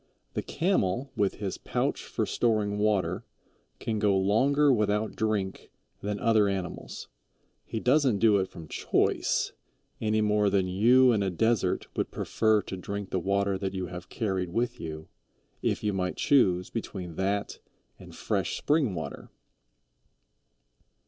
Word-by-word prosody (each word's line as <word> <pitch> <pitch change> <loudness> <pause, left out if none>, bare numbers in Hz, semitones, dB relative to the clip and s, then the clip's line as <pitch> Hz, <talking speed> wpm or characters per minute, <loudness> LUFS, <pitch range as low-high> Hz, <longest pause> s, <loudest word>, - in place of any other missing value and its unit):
The - - -1
Camel, 135 - 0
with 100 -4 +1
his 100 -3 -4
pouch - - -1
for - - -2
storing 105 -3 0
water, 105 -3 +1 0.5
can 110 -2 -2
go 100 -2 +3
longer 135 +9 +3
without 105 -1 0
drink 105 -3 -2 0.3
than 105 0 -3
other 110 -3 +4
animals. 95 -3 -4 0.6
He 110 - -4
doesn't 130 -2 +3
do 105 0 +5
it 95 -1 0
from 80 -2 -10
choice, - - 0 0.5
any 110 0 +1
more 105 -1 +3
than 95 -1 +2
you 120 +8 +5
in 110 -3 +2
a 100 - +1
desert 105 0 +1
would - - -1
prefer 110 -2 +1
to 95 - -6
drink 100 +2 -5
the 95 - +1
water 100 +1 0
that 95 0 -3
you 95 -1 -2
have 90 0 -8
carried 95 -6 -2
with 120 +6 -1
you, 80 -1 -6 0.5
if - - -1
you 105 -1 0
might 90 -1 -2
choose 90 -10 +3
between 95 -6 -5
that 100 +1 -1 0.4
and - - -12
fresh - - -1
spring 145 - +1
water. 80 -4 -6
105 Hz, 145 wpm, -28 LUFS, 95-115 Hz, 0.6 s, do